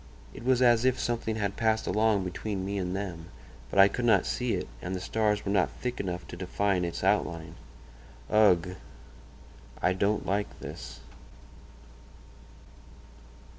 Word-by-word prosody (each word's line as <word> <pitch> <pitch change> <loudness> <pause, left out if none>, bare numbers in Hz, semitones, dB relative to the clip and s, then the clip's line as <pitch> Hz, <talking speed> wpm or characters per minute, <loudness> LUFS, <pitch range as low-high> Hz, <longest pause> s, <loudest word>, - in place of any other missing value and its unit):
It - - -10
was 130 0 +3
as 120 -1 +5
if 130 0 +2
something 115 -2 -1
had 100 -2 -2
passed 110 -1 +1
along 105 -2 +2
between 95 +1 -4
me 100 +1 -2
and 90 0 -2
them; 90 -5 -5 0.4
but - - -4
I 100 0 +9
could 120 +5 -3
not 120 - +4
see 125 -2 -1
it, - - -4
and 90 +2 -4
the - - -3
stars 105 +1 0
were 100 - -1
not 100 -3 +3
thick 125 -1 -5
enough 90 -2 -4
to - - -7
define 95 +1 0
its 85 -1 -4
outline. 80 0 0 0.7
Ugh! 90 -4 +3 1.0
I 90 - +2
don't 100 +3 0
like 100 +1 -2
this." - - -8
100 Hz, 150 wpm, -29 LUFS, 90-110 Hz, 1.0 s, I